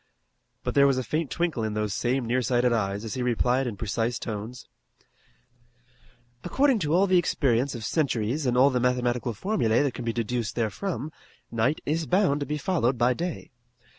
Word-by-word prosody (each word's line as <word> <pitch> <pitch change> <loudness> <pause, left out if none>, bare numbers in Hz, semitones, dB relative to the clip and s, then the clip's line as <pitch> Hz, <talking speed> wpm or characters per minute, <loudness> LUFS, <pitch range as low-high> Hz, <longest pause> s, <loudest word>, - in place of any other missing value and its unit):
But - - -2
there 140 0 +5
was 135 -2 +2
a 130 - -1
faint 155 +2 -2
twinkle 160 -4 -1
in 110 -1 -2
those 105 -2 -1
same 125 +3 0
nearsighted 120 0 +1
eyes 100 -1 -1
as 110 - -4
he 130 - -3
replied 125 +2 +1
in 110 -4 -5
precise 115 +2 -1
tones: 110 +2 -6 1.8
"According 265 +6 +2
to 155 -4 -1
all 190 +2 +4
the 185 -2 +4
experience 135 -5 +1
of 115 -2 -6
centuries 135 -2 0
and 125 0 +1
all 135 +2 +6
the 125 - +1
mathematical 125 -1 0
formulae 120 - +1
that 140 -4 -1
can 125 - -6
be 115 - -1
deduced 115 0 -2
therefrom 150 - -3 0.4
night 120 +6 0
is 160 +2 -1
bound 180 -6 +2
to 145 - -4
be 150 - -2
followed 140 -6 0
by 120 +2 +3
day. 175 +4 -5
125 Hz, 180 wpm, -26 LUFS, 115-150 Hz, 1.8 s, all